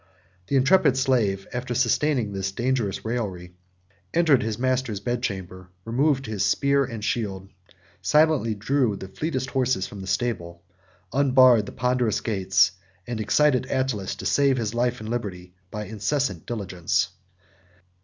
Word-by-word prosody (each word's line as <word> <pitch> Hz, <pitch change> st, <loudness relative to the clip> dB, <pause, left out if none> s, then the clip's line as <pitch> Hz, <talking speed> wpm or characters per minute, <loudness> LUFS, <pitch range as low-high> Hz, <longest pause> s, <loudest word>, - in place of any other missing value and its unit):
The 140 Hz, -, -1 dB
intrepid 135 Hz, 0 st, +4 dB
slave, 115 Hz, -8 st, +1 dB
after 125 Hz, 0 st, -3 dB
sustaining 125 Hz, -2 st, +1 dB
this 95 Hz, 0 st, -2 dB
dangerous 120 Hz, -3 st, -1 dB
raillery, 95 Hz, -7 st, -4 dB, 0.6 s
entered 160 Hz, -6 st, +4 dB
his 110 Hz, -1 st, -2 dB
master's 130 Hz, -4 st, -1 dB
bedchamber; 95 Hz, -6 st, -4 dB, 0.2 s
removed 135 Hz, +4 st, +1 dB
his 110 Hz, -4 st, -2 dB
spear 140 Hz, 0 st, +2 dB
and 115 Hz, -4 st, -5 dB
shield; 95 Hz, -5 st, -2 dB, 0.5 s
silently 150 Hz, 0 st, +3 dB
drew 120 Hz, +1 st, +1 dB
the 95 Hz, -, -8 dB
fleetest 130 Hz, +3 st, -3 dB
horses 130 Hz, -7 st, +1 dB
from 100 Hz, -, -9 dB
the 95 Hz, -, -8 dB
stable; 95 Hz, -5 st, -2 dB, 0.5 s
unbarred 130 Hz, -5 st, +5 dB
the -, -, -7 dB
ponderous 125 Hz, -3 st, 0 dB
gates; 95 Hz, -4 st, +2 dB, 0.3 s
and 120 Hz, -2 st, -4 dB
excited 130 Hz, +3 st, +2 dB
Attalus 130 Hz, -7 st, -1 dB
to -, -, -9 dB
save 140 Hz, -2 st, +3 dB
his 110 Hz, -2 st, -2 dB
life 120 Hz, 0 st, 0 dB
and 110 Hz, -, -6 dB
liberty 95 Hz, -7 st, -5 dB, 0.2 s
by 105 Hz, +2 st, -5 dB
incessant 110 Hz, -, -2 dB
diligence. 95 Hz, -8 st, -1 dB
120 Hz, 135 wpm, -24 LUFS, 100-130 Hz, 0.6 s, unbarred